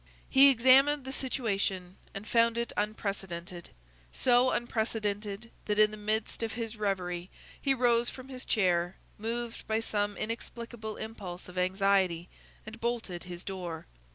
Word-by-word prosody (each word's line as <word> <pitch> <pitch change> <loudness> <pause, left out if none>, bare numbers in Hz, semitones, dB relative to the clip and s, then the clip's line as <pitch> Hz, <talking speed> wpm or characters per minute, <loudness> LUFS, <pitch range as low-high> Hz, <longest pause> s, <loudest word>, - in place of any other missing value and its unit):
He 275 +1 +9
examined 270 +3 +5
the 265 - -4
situation, 195 -9 -1 0.2
and 200 +2 -6
found 230 0 +3
it 235 -1 -2
unprecedented; 195 -5 -3 0.4
so 250 0 +4
unprecedented 220 -2 -2
that 210 -1 0
in 215 0 +6
the - - -6
midst 215 +2 -2
of 225 -1 -2
his 230 -1 -4
reverie 185 -4 -2 0.3
he 270 -1 +3
rose 240 -1 +3
from 255 0 -10
his 255 -1 -7
chair, 180 -4 +2 0.2
moved 230 +1 -4
by 220 0 +1
some 205 -2 -1
inexplicable 230 0 -5
impulse 195 -5 -6
of 180 - -11
anxiety, 185 -2 +2 0.4
and 220 +1 -9
bolted 230 -7 -2
his 175 -1 -8
door. 180 -4 -5
215 Hz, 140 wpm, -30 LUFS, 190-235 Hz, 0.4 s, He